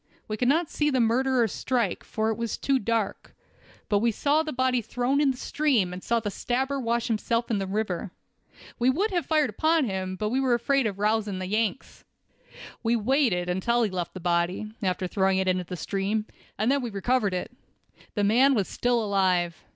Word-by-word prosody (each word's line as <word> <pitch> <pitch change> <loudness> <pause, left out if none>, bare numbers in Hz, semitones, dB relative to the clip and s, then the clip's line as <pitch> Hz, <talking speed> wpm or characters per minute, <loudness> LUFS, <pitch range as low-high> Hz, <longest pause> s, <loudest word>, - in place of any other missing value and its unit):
We 215 - -2
could 245 +3 0
not 320 +5 +3
see 295 0 0
the 260 -3 +1
murderer 245 +1 +2
strike, 235 -1 -1
for 220 0 -1
it - - -2
was 230 0 -3
too 275 -1 +1
dark; 225 -2 -2 0.5
but 205 - +2
we 230 +2 +2
saw 290 +7 +2
the 315 -1 -4
body 255 -1 +1
thrown 250 +5 0
in 290 - +3
the 260 - -1
stream, 250 -12 +1
and 180 - -8
saw 235 0 +1
the 210 -2 -4
stabber 265 +7 -1
wash 235 -1 0
himself 230 +1 -1
in 210 - +1
the 195 - -3
river. 200 -2 -2 0.7
We 245 +2 +3
would 390 +11 +1
have 345 -6 -1
fired 305 -6 +2
upon 315 +6 +2
him, 190 -3 -3
but 210 +3 -2
were 260 -1 +2
afraid 270 +1 +1
of 200 -2 -4
rousing 210 -1 0
the 185 - -4
Yanks. 215 +5 -2 0.8
We 230 +1 +1
waited 230 -6 +1
until 235 +7 +1
he 210 - 0
left 180 -1 -4
the - - -5
body, 175 +4 -1
after 185 -1 -1
throwing 190 +1 +1
it 190 0 0
into 185 -1 +1
the 180 +1 -6
stream, 200 +5 -1 0.3
and 220 +5 +2
then 280 0 +2
we 240 - -3
recovered 205 0 0
it. 200 +7 -5 0.6
The 205 - +1
man 255 +7 +4
was 200 -5 0
still 245 -2 0
alive. 185 -4 +1
225 Hz, 200 wpm, -26 LUFS, 195-260 Hz, 0.8 s, man